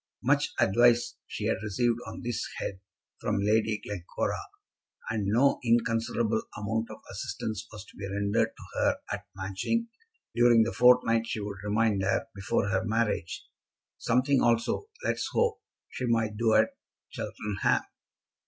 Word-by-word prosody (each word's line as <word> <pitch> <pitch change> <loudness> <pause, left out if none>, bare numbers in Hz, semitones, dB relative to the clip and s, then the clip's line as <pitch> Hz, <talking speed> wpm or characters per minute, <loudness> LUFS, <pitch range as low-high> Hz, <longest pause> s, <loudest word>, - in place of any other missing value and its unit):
Much 145 +2 +3
advice 120 +3 +4
she 105 - -5
had 110 - +1
received 115 +3 0
on - - -7
this 120 -1 -2
head 95 - -4 0.4
from 105 - -1
Lady 110 +1 +2
Glencora, 90 -4 -3 0.7
and 105 -3 -1
no 125 +7 +3
inconsiderable 115 -1 +1 0.2
amount 110 +2 -2
of - - -10
assistance 110 0 -4
was 105 -2 -9
to - - -18
be 100 - -5
rendered 100 +3 +1
to - - -11 0.2
her - - +2
at - - -4
Matching 95 - -2 0.4
during 120 -1 +6
the 115 - -2
fortnight 120 -2 +5
she - - -3
would 100 -1 -5
remain 105 0 +2
there 95 +2 +1
before 100 0 -1
her 95 -2 +1
marriage. 110 -6 -1 0.5
Something 130 +3 +2
also, 120 - +1 0.2
let - - 0
us - - -2
hope, 470 -1 +1 0.3
she 125 - -3
might 110 -2 +1
do 110 0 +2
at 110 +1 +5 0.4
Cheltenham. 105 -2 -1
110 Hz, 145 wpm, -29 LUFS, 105-120 Hz, 0.7 s, during